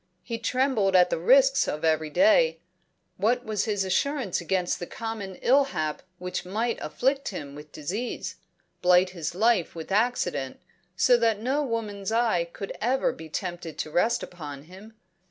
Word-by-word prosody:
He 230 -2 -4
trembled 235 -5 +1
at 180 -1 +5
the - - 0
risks 270 +8 +5
of 150 +2 -2
every 155 -1 +1
day; 325 - +4 0.6
what 245 +6 +1
was 210 -2 -1
his 205 -3 0
assurance 260 - 0
against 180 +1 -1
the 175 - -5
common 220 -4 -5
ill 275 +3 +5
hap 155 - -3 0.2
which 180 0 -4
might 220 +6 -2
afflict 275 +2 0
him 145 -8 -6
with 150 +1 -11
disease, 195 +11 -4 0.4
blight 180 +1 +4
his 170 -2 -5
life 215 -4 +2
with 165 +3 -7
accident, 195 - 0 0.4
so 245 +5 +5
that 225 -3 +2
no 265 +6 0
woman's 220 -5 -3
eye 225 -7 +2
could 195 - -6
ever 255 +4 +1
be 160 0 -10
tempted 175 -2 -5
to 155 - -4
rest 225 +9 +2
upon 145 -5 -8
him? 195 +7 -14
200 Hz, 160 wpm, -26 LUFS, 175-240 Hz, 0.6 s, at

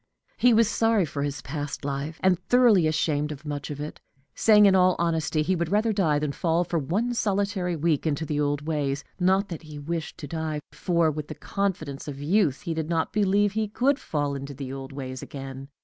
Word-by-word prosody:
He 245 - +4
was 230 -1 +5
sorry 225 -3 +2
for 145 -1 -5
his 145 -1 -3
past 145 -2 -5
life, 145 +3 -3
and 185 -2 +4
thoroughly 220 -5 +4
ashamed 155 -1 0
of 150 +1 -8
much 145 -1 -4
of 145 -1 -5
it, 150 +1 -6 0.3
saying 210 -2 +6
in 195 - +6
all 185 -1 +5
honesty 160 -2 0
he 185 +4 +1
would 170 -2 -1
rather 215 +3 +2
die 165 -8 +2
than 150 -1 -1
fall 165 +3 +1
for 170 -1 -1
one 205 - -1
solitary 200 -5 0
week 160 -1 0
into 155 +1 -1
the 150 -1 -2
old 145 0 0
ways 140 -3 -1 0.2
not 190 +2 +2
that 170 - -6
he 155 -2 -10
wished 160 +3 -4
to 145 - -7
die, 160 0 -3
for, 170 -3 +1
with 150 0 -5
the - - -7
confidence 160 -9 -3
of 140 -2 -6
youth, 155 -1 +2
he 170 -5 -3
did 160 0 -3
not 165 -2 0
believe 205 0 +3
he 215 +1 -1
could 260 +7 +1
fall 145 -2 -2
into 140 0 -6
the 135 -1 -6
old 135 0 -7
ways 130 -2 -6
again. 135 -1 -8
160 Hz, 210 wpm, -26 LUFS, 145-190 Hz, 0.3 s, saying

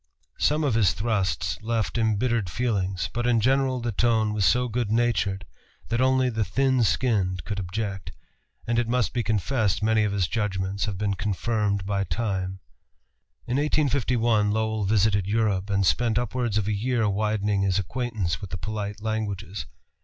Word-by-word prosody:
Some 150 +1 +2
of 140 -5 +1
his 105 -6 +3
thrusts 100 - -1
left 110 -2 -1
embittered 115 -2 +1
feelings, 95 -5 -1
but 120 +1 -1
in 120 -2 +3
general 130 +2 +2
the 120 -1 -2
tone 110 0 +2
was 105 -3 +1
so 125 +8 +3
good 120 -1 -2
natured 100 -5 +1 0.4
that 120 +2 0
only 130 -1 +3
the 110 -1 0
thin 130 +5 +2
skinned 95 - +1
could 105 -1 -3
object, 95 +1 -4 0.5
and 120 0 +1
it 120 - 0
must 125 0 0
be 120 - 0
confessed 110 0 0
many 110 0 +3
of 105 - 0
his 100 -4 0
judgments 100 -2 -1
have 105 -3 -4
been 100 0 0
confirmed 105 0 -1
by 100 0 0
Time. 95 -1 -3 0.8
In 125 - -1
1851 125 -7 +2
Lowell 110 0 0
visited 100 -1 +2
Europe, 105 -2 0
and 100 -1 +1
spent 115 +3 +2
upwards 120 -2 -1
of 105 -2 0
a 105 - +1
year 115 +1 0
widening 105 0 0
his 95 -1 +1
acquaintance 100 -4 -2
with 100 - -6
the 95 - -4
polite 105 +1 -5
languages. 100 - -3
110 Hz, 165 wpm, -25 LUFS, 100-120 Hz, 0.8 s, his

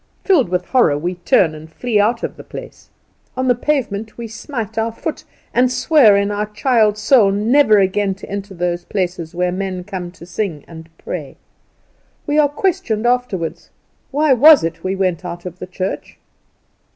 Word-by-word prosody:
Filled 315 - +3
with 180 0 -1
horror, 235 - +3
we 175 +5 -2
turn 175 -2 +2
and 155 +1 -11
flee 225 +4 -1
out 230 +3 +1
of - - -3
the - - -11
place. - - -11 0.5
On 260 0 0
the 250 - +5
pavement 230 -5 -2
we 235 -1 -6
smite 225 -1 -6
our 225 +1 -1
foot, 310 +7 -5 0.3
and 250 0 +3
swear 255 -8 +5
in 200 +1 0
our 210 +1 -2
child's 215 -1 +1
soul 215 -1 +4
never 215 +3 +4
again 195 0 +1
to 195 - -11
enter 200 0 -6
those 175 0 -2
places 175 -4 -3
where 180 0 0
men 185 -1 -4
come 180 -2 -6
to 170 - -13
sing 175 -4 -4
and 165 -1 -12
pray. - - -7 0.9
We 295 +1 +1
are 290 -1 +4
questioned 290 - -1
afterward. 240 -9 -1 0.5
Why 295 0 +3
was 295 +4 +7
it 165 0 -4
we 190 +1 -1
went 185 -3 -1
out 175 0 -7
of 180 0 -8
the - - -7
church. 185 +1 -5
205 Hz, 175 wpm, -18 LUFS, 180-245 Hz, 0.9 s, was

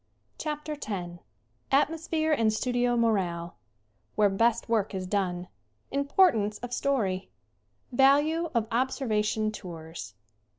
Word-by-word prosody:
CHAPTER 300 0 -3
X 175 -4 -5 0.5
Atmosphere 315 +2 +1
and 225 -6 +3
studio 245 +2 +1
morale 180 -7 0 0.6
Where 205 -2 +4
best 230 +3 +2
work 220 -3 0
is 185 -1 -3
done 180 -2 -1 0.4
Importance 280 - +3
of 245 0 -7
story 210 -10 0 0.6
Value 290 +6 +4
of 225 -2 +1
'Observation 220 -4 0
Tours." 165 - -8
225 Hz, 100 wpm, -28 LUFS, 195-275 Hz, 0.6 s, Where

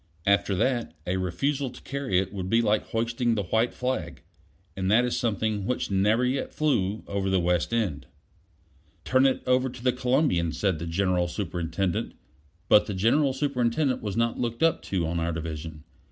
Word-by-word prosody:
After 100 0 +2
that, 120 -3 0
a 90 +1 -1
refusal 135 - -1
to 125 - -12
carry 140 -9 -1
it 95 +1 0
would 95 -2 -4
be 115 - +4
like 105 -2 +1
hoisting 115 +1 0
the 105 - -1
white 110 +6 +1
flag; 125 -12 -3 0.5
and 95 -1 -1
that 115 +4 +4
is 125 - -1
something 110 -3 -1
which 125 -4 -2
never 105 +6 +3
yet 130 +2 -1
flew 110 -9 0
over 100 -1 -2
the 95 -1 +2
West 85 +2 +1
End. 90 - -1 1.0
"Turn 130 +1 +4
it 130 - -1
over 130 +1 +2
to 125 -1 -11
the 125 -1 +3
Columbian," 125 - +1
said 95 0 0
the 85 - -5
General 90 0 +1
Superintendent; 85 -1 -2 0.5
but 105 - +5
the 105 - -3
General 130 +9 +3
Superintendent 130 0 0
was 105 0 -4
not 115 0 0
looked 120 +3 -2
up 165 -1 +3
to 90 -4 -2
on 85 +1 -2
our 85 +1 -1
division. 80 -1 -6
105 Hz, 180 wpm, -26 LUFS, 90-125 Hz, 1.0 s, but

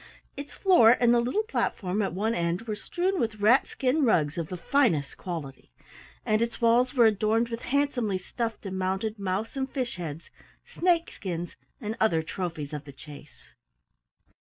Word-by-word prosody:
Its 285 +1 -7
floor 255 - +6
and 240 -1 +4
the 240 - +4
little 255 - 0
platform 210 - -1
at 195 - -1
one 215 +5 -1
end 170 +1 -1
were 220 -2 -4
strewn 360 - -2
with 220 -2 -2
rat 225 +6 +4
skin 270 +4 0
rugs 155 - +2
of 165 -2 -3
the 180 - -5
finest 180 - +1
quality, 145 - -7 0.5
and 215 +1 +2
its 235 0 -2
walls 245 +3 +3
were 240 -3 +6
adorned 220 +2 +2
with 230 0 -5
handsomely 250 -7 0
stuffed 225 +4 -5
and 190 -1 -4
mounted 195 +4 -2
mouse 195 +6 -2
and 265 0 -2
fish 255 -7 -3
heads, 165 -2 -7 0.3
snake 345 -2 +1
skins, 175 -3 -5 0.2
and 220 -3 -4
other 165 -8 +2
trophies 160 -3 -5
of 150 -1 -5
the 140 - -10
chase. 145 +2 -14
215 Hz, 170 wpm, -27 LUFS, 175-245 Hz, 0.5 s, floor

